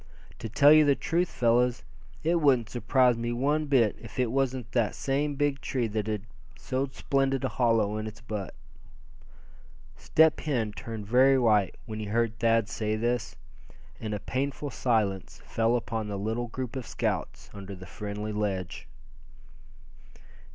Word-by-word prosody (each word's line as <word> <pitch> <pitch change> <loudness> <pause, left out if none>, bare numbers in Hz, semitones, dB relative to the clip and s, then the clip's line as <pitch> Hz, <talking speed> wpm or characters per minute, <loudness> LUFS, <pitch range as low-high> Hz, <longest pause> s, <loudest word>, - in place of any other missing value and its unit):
To 115 - -5
tell 145 +7 +6
you 155 0 +7
the 140 -2 +4
truth, 175 +5 0
fellows, 120 -5 +2 0.4
it 170 +1 +2
wouldn't 130 -7 +3
surprise 125 +1 +3
me 120 +1 -2
one 145 +5 0
bit 125 -7 +3
if - - -11
it 125 -3 +1
was 135 -1 +1
that 120 -3 -1
same 145 +2 -1
big 145 -1 0
tree 130 -4 -1
that 105 0 -2
had 105 -3 -2 0.3
so 130 - -2
splendid 135 -1 0
a - - 0
hollow 115 -4 +1
in 110 0 -4
its 110 0 -9
butt." 105 -4 -6 1.4
Step 160 0 +3
Hen 120 -8 -1
turned 110 0 -7
very 130 +5 +5
white 105 -6 +3
when 110 -2 -6
he 110 - -4
heard 115 +1 0
Thad 115 -2 +3
say 110 -1 -2
this, 115 -7 -1 0.6
and 105 -1 -3
a - - -4
painful 140 +5 -3
silence 105 -7 -1
fell 115 +1 +1
upon 115 -2 -2
the 100 -1 -4
little 110 +4 -2
group 125 +1 -5
of 130 -3 -5
scouts - - -3
under 100 -1 -8
the 95 0 -11
friendly 105 +3 -5
ledge. 100 -4 -3
115 Hz, 160 wpm, -28 LUFS, 105-135 Hz, 1.4 s, you